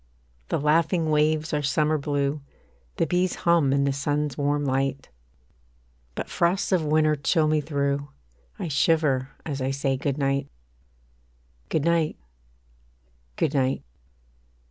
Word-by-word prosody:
The - - 0
laughing 160 +2 +2
waves 155 +1 +1
are 150 - +1
summer 150 +2 +1
blue, 140 0 -1 0.5
The - - +1
bees 180 +3 0
hum 170 -5 +4
in 140 0 +2
the 140 0 +1
sun's 145 0 -1
warm 145 0 0
light; 135 0 -1 1.1
But - - -4
frosts 175 +4 0
of 180 -4 +3
winter 155 0 +3
chill 155 +2 +1
me 155 0 +2
through, 140 -1 -1 0.5
I - - -4
shiver 145 -3 +2 0.2
as 140 -3 -4
I 130 - 0
say 135 0 -1
Good 140 +1 -2
night. 140 -1 0 1.2
Good 155 -2 0
night 170 -2 +1 1.2
Good 145 - 0
night. 135 -2 0
145 Hz, 130 wpm, -25 LUFS, 140-155 Hz, 1.2 s, hum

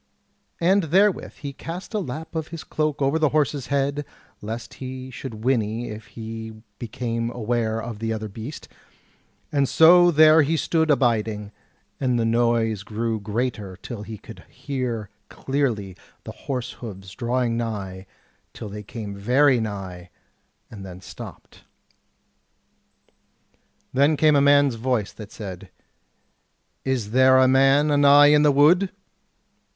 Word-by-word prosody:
And 185 +2 +3
therewith 195 +5 +2
he 140 -1 -8
cast 175 +9 -8
a 215 - 0
lap 160 -2 -6
of 160 -1 -3
his 165 -1 -8
cloak 155 -2 -2
over 140 +4 +1
the 155 -2 +3
horse's 145 -3 0
head, 140 +1 0 0.4
lest 110 +3 -6
he 130 0 -7
should 115 -3 -8
whinny 115 -2 0
if 110 +2 -9
he 110 -1 -8 0.2
became 115 0 -3
aware 115 -1 -1
of 115 -2 -6
the 115 0 -2
other 110 -1 -3
beast; 115 +8 -8 0.8
and 140 -3 +1
so 175 +5 +7
there 155 0 +6
he 155 +3 +1
stood 160 0 +1
abiding, 110 -6 +1 0.5
and 125 -3 +1
the 115 - +1
noise 115 -2 +1
grew 110 +2 -3
greater 105 -3 -3
till 115 +2 -8
he 110 +1 -8
could - - -12
hear 125 -7 -4 0.2
clearly 120 -9 -2 0.3
the - - -7
horse 130 -2 -5
hoofs 95 -5 -9
drawing 120 +1 -1
nigh, 100 -5 -4 0.5
till 105 - -8
they 105 +1 -7
came 105 0 -7
very 125 +6 +3
nigh, 95 -5 -6 0.6
and 105 -3 -9
then 90 -1 -9
stopped. - - -12 2.3
Then 140 +3 +3
came 155 0 +4
a 140 - +4
man's 140 -1 +5
voice 120 -5 -1
that 105 -1 -11
said: 95 -3 -8 1.1
"Is 125 -6 -2
there 130 +1 +5
a 130 0 +5
man 135 +3 +4
anigh 145 0 +6
in 150 - +5
the 150 -1 +5
wood?" 165 +7 +4
125 Hz, 140 wpm, -23 LUFS, 110-145 Hz, 2.3 s, so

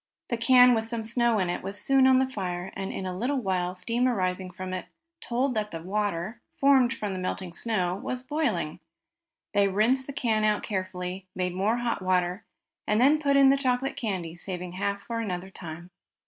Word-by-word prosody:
The 235 - 0
can, 250 +1 +7
with 225 -1 0
some 225 0 -3
snow 235 0 +2
in 185 -3 +1
it, 175 - -2
was 195 +2 -4
soon 270 -1 +4
on 260 0 +6
the 260 0 +3
fire, 185 -6 -4
and 195 0 -4
in 190 - -5
a 185 -1 -3
little 255 +9 -1
while 185 -5 -1
steam 230 +7 0
arising 185 -5 -1
from 185 +1 -6
it 185 - -4 0.3
told 250 +2 0
that 215 -2 -1
the 165 -3 -7
water, 205 +2 -2
formed 270 -4 +4
from 205 -2 -3
the 185 - -4
melting 185 -1 -4
snow, 185 -4 -1
was 255 +5 -5
boiling. 260 - -1 0.7
They 200 -1 +4
rinsed 230 +7 +2
the 280 - -5
can 225 -6 +1
out 210 -1 +2
carefully, 185 -1 -4
made 180 -1 -1
more 205 +6 +1
hot 240 -4 -1
water, 185 +2 0 0.4
and 210 +1 +2
then 290 +5 +5
put 280 -2 +2
in 270 -1 +7
the 275 - +3
chocolate 265 0 0
candy, 185 -7 -3
saving 180 0 -5
half 200 +2 -2
for 230 -1 -4
another 190 -3 -4
time. 170 0 -9
205 Hz, 200 wpm, -27 LUFS, 185-245 Hz, 0.7 s, can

